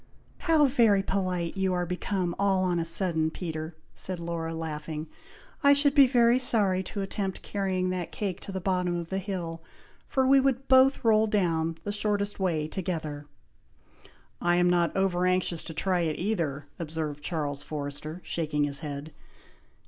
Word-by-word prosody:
"How 320 -4 +4
very 230 -7 +4
polite 185 -3 -1
you 190 -1 0
are 180 0 0
become 180 0 -2
all 195 -2 +2
on 175 -2 +1
a 165 - -1
sudden, 165 -2 +1
Peter!" 160 -1 -5 0.2
said 185 -2 -2
Laura, 170 -1 -3
laughing. 155 -1 -5 0.6
"I 280 0 +7
should 285 0 +3
be 280 -3 +7
very 240 -1 +4
sorry 205 -7 +3
to 200 - -4
attempt 195 0 -4
carrying 185 -2 -1
that 175 -2 -3
cake 185 +2 -3
to - - -8
the 190 - -3
bottom 180 -1 0
of 170 -1 -4
the 190 - -1
hill, 175 -4 -4 0.5
for 265 -1 +1
we 270 +1 +6
would 270 0 0
both 260 -1 +5
roll 220 -1 +5
down, 165 -6 0
the 205 - -3
shortest 205 -1 -1
way, 165 -5 0
together." 155 -5 -4 1.1
"I 175 0 +3
am 175 0 +3
not 175 0 +1
over 180 -2 +2
anxious 185 -2 0
to 160 - -6
try 185 +2 +1
it 160 -3 -1
either," 165 -8 -2
observed 155 -3 -4
Charles 145 -3 -2
Forrester, 150 +3 -5
shaking 150 -3 -1
his 145 -1 +1
head. 145 0 -6
180 Hz, 165 wpm, -28 LUFS, 160-200 Hz, 1.1 s, I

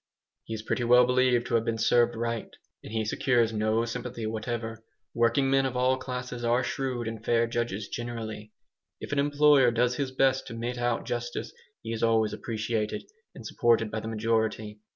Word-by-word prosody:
He 115 - -4
is 110 - -7
pretty 120 - -1
well 125 +1 +6
believed 125 -1 +2
to - - -5
have 115 -1 +3
been 115 -1 -1
served 120 +1 +3
right, 115 -1 -3 0.3
and - - -9
he 110 -1 -1
secures 115 0 +1
no 110 +2 +1
sympathy 120 -1 -5
whatever. 115 0 -4 0.3
Working 120 +3 +2
men 135 0 +4
of 125 -1 -4
all 130 +1 +2
classes 125 -1 -5
are 120 +2 +2
shrewd 125 -3 -2
and 110 -1 -6
fair 115 0 +2
judges 115 -3 -3
generally. 110 -3 -6 0.5
If - - -7
an 145 - +1
employer 145 -2 +5
does 120 +1 +1
his 140 -2 -1
best 130 0 +2
to 115 - -7
mete 120 +2 -4
out 120 -1 0
justice 120 - -4 0.3
he 115 - -4
is 115 - -4
always 110 -2 +2
appreciated 110 -1 -3 0.3
and - - -10
supported 115 -2 +2
by 110 - -2
the 110 - -7
majority. 110 -1 -1
115 Hz, 185 wpm, -28 LUFS, 110-125 Hz, 0.5 s, well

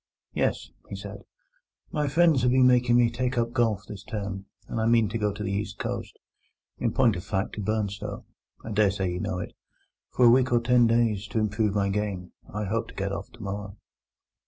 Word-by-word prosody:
"Yes," - - -1 0.2
he - - -5
said; - - -8 0.7
"my 150 -2 0
friends 160 -1 +4
have 125 - +3
been 130 +1 +5
making 125 -1 +4
me 120 -1 +4
take 125 +1 -2
up 115 0 0
golf 115 -5 +1
this 100 -2 -8
term, 100 -2 -5 0.2
and 110 - -2
I 110 - +1
mean 115 -2 +4
to 115 +2 -3
go 105 -1 +1
to 105 +1 -6
the 100 - -2
East 100 +1 -3
Coast—in 115 - -6
point 120 -6 +3
of 90 - -6
fact 95 0 -2
to 105 - -4
Burnstow—(I 105 +1 -5
dare 105 -1 +4
say 95 -2 -1
you 90 - -3
know 95 - -2
it) 90 - -5 0.6
for 125 - +3
a 120 - +8
week 130 +1 +4
or 120 - +4
ten 120 0 +4
days, 115 -3 +1
to 110 - -1
improve 105 -1 0
my 100 -1 +1
game. 100 -3 -3 0.2
I 105 +1 -3
hope 115 +4 -1
to - - -13
get 100 0 -2
off 100 0 -5
tomorrow." 100 -3 -6
110 Hz, 205 wpm, -27 LUFS, 100-120 Hz, 0.7 s, a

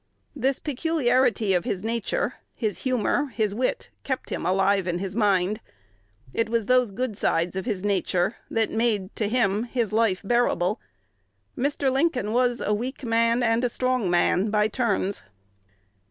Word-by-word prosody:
This 265 0 0
peculiarity 255 -7 +1
of 175 -2 +1
his 185 - -3
nature, 235 - -1 0.2
his 215 -4 -2
humor, 255 +3 0
his 215 -2 0
wit, 255 - -2
kept 260 -2 -3
him - - -2
alive 195 0 +2
in 175 -1 0
his 190 +1 -5
mind.... 205 -1 +2 0.7
It 225 -1 0
was 230 -2 0
those 250 -1 +3
good 225 +2 -3
sides 170 -1 0
of 190 - -3
his 205 -6 -2
nature 195 0 0
that 225 -1 0
made, 220 -4 0
to 215 - 0
him, 220 -2 +1
his 235 -3 -2
life 215 -4 +2
bearable. 210 -4 +1 0.8
Mr. 280 0 0
Lincoln 265 -6 0
was 245 0 +2
a 210 - 0
weak 250 +6 -4
man 230 +1 +2
and 230 +1 +2
a 245 - +2
strong 255 -5 0
man 180 +3 +2
by 210 0 +2
turns." 205 -4 -1
225 Hz, 155 wpm, -25 LUFS, 200-250 Hz, 0.8 s, those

